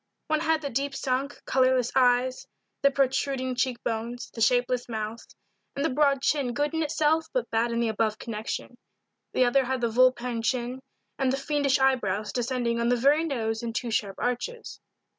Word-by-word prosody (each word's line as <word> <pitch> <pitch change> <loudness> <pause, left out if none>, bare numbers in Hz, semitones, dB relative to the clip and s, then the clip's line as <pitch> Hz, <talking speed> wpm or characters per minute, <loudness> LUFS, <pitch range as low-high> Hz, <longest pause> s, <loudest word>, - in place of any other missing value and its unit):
One 310 0 +2
had 320 -1 +1
the 280 - -3
deep 275 +3 -2
sunk, 270 +1 -2
colorless 255 -2 +2
eyes, 255 0 +2 0.3
the 280 - +5
protruding 270 -1 0
cheek 250 -1 0
bones, 235 +2 -4
the 225 - -6
shapeless 245 +1 +2
mouth, 220 0 -5 0.5
and 280 - -1
the 320 - +1
broad 275 0 +2
chin 270 -6 +1
good 290 +2 0
in 320 - 0
itself 315 +1 +1
but - - -1
bad 230 +1 +1
in 235 - -1
the 235 -1 +1
above 220 0 0
connection; 230 +2 -5 0.6
the 255 - +4
other 260 +2 +3
had 260 +1 -1
the 235 -1 0
vulpine 250 -1 +2
chin, 245 +2 -1 0.4
and 265 -1 +2
the 270 - 0
fiendish 285 -1 +1
eyebrows 215 -7 +1
descending 240 -1 -1
on 235 0 +1
the 245 - +4
very 285 +6 +3
nose 225 -7 -2
in 235 -1 -4
two 235 0 -3
sharp 200 -3 -1
arches. 445 - -3
255 Hz, 180 wpm, -27 LUFS, 235-275 Hz, 0.6 s, the